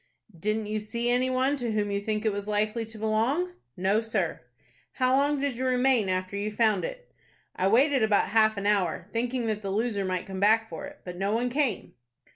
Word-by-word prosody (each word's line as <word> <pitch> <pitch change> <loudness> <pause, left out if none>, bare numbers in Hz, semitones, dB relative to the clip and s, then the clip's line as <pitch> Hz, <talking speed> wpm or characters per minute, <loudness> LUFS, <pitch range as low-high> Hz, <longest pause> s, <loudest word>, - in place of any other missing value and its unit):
"Didn't 215 +5 -1
you 215 +1 -2
see 235 +3 -2
any 250 +1 +2
one 260 +2 +1
to 240 -4 -2
whom 205 -1 0
you 200 0 -1
think 215 +1 -2
it 215 - +3
was 200 0 -5
likely 215 +2 0
to 225 0 -10
belong?" 230 +12 0 0.2
"No, 195 +4 +2
sir." 215 - -2 0.5
"How 255 0 +2
long 285 +1 +2
did 275 -3 -1
you 260 - -3
remain 250 -5 +3
after 185 +1 -2
you 205 +1 -2
found 215 -3 +2
it?" - - -7 0.4
"I 185 - +1
waited 265 +5 +4
about 215 -2 +3
half 220 -1 +3
an 200 - -3
hour, 190 -4 +1
thinking 240 +1 -1
that 215 -1 -2
the 200 - -4
loser 210 0 -1
might 185 -1 -2
come 190 -1 -6
back 220 +3 +4
for 165 -5 -7
it; - - -14
but 180 -1 -7
no 195 +3 0
one 240 +2 0
came." 270 -6 -1
220 Hz, 215 wpm, -27 LUFS, 200-245 Hz, 0.5 s, waited